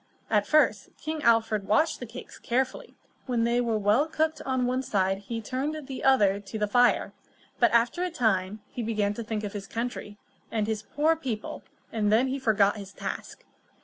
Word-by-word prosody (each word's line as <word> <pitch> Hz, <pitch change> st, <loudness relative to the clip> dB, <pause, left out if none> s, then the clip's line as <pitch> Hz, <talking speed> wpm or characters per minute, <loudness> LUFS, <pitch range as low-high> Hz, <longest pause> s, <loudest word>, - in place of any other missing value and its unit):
At 210 Hz, -2 st, +3 dB
first, 310 Hz, 0 st, +3 dB
King 310 Hz, 0 st, -4 dB
Alfred 225 Hz, -4 st, +2 dB
watched 310 Hz, +10 st, +2 dB
the 245 Hz, -, -6 dB
cakes 240 Hz, +3 st, -10 dB
carefully; 260 Hz, -, -2 dB, 0.3 s
when 240 Hz, -3 st, +1 dB
they 235 Hz, +1 st, +2 dB
were 230 Hz, -2 st, 0 dB
well 215 Hz, +8 st, +3 dB
cooked 315 Hz, 0 st, -1 dB
on 260 Hz, -1 st, +1 dB
one 255 Hz, +1 st, 0 dB
side 195 Hz, -5 st, 0 dB
he 225 Hz, +3 st, -5 dB
turned 275 Hz, +6 st, -3 dB
the 265 Hz, -1 st, -6 dB
other 205 Hz, -7 st, +4 dB
to 205 Hz, +1 st, -7 dB
the 210 Hz, -1 st, 0 dB
fire. 245 Hz, +4 st, +3 dB, 0.5 s
But, 235 Hz, -, +5 dB
after 235 Hz, +9 st, +2 dB
a 365 Hz, -, 0 dB
time, 215 Hz, -, 0 dB
he 245 Hz, -, -4 dB
began 215 Hz, -3 st, 0 dB
to 230 Hz, -, -5 dB
think 220 Hz, -1 st, -3 dB
of 205 Hz, -, -4 dB
his 200 Hz, -1 st, -6 dB
country, 230 Hz, -3 st, -4 dB, 0.3 s
and 225 Hz, -, -1 dB
of -, -, -2 dB
his 220 Hz, -1 st, -1 dB
poor 300 Hz, +8 st, +1 dB
people, 250 Hz, -9 st, -5 dB, 0.3 s
and 210 Hz, -2 st, +1 dB
then 240 Hz, +5 st, +4 dB
he 270 Hz, +1 st, -2 dB
forgot 215 Hz, -4 st, +3 dB
his 200 Hz, -1 st, -9 dB
task. -, -, -6 dB
230 Hz, 195 wpm, -27 LUFS, 210-260 Hz, 0.5 s, But